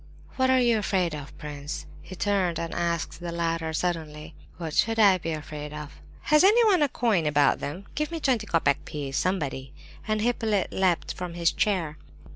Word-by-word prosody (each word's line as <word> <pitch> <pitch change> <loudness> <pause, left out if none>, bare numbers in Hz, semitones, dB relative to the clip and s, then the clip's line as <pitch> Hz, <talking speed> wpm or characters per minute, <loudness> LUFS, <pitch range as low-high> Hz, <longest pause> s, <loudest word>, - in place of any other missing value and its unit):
"What 260 -1 +2
are 260 0 +5
you 235 -3 +3
afraid 185 -5 0
of, 145 -1 -8
prince?" 145 -1 -6 0.2
he 185 - -10
turned 185 -3 0
and 165 -1 -4
asked 170 -1 -2
the 175 -1 -5
latter 165 -1 -1
suddenly. 160 -2 -3 0.2
"What 165 -3 -5
should 225 +7 +2
I 200 -4 +6
be 165 - -4
afraid 150 -1 -6
of?" 150 -1 -9 0.2
"Has 300 +2 +4
anyone 420 -3 +5
a 295 - +3
coin 215 -11 +1
about 145 -1 +3
them? 175 +8 -6
Give 300 0 -1
me 335 - -4
a - - -8
twenty 245 -7 +1
copeck 150 -6 +1
piece, 140 -2 -5
somebody!" 140 -8 -2 0.3
And 215 0 +1
Hippolyte 220 -4 0
leapt 185 -3 +1
from 180 -2 -6
his 170 -1 +2
chair. 170 -7 0
175 Hz, 185 wpm, -26 LUFS, 155-215 Hz, 0.3 s, I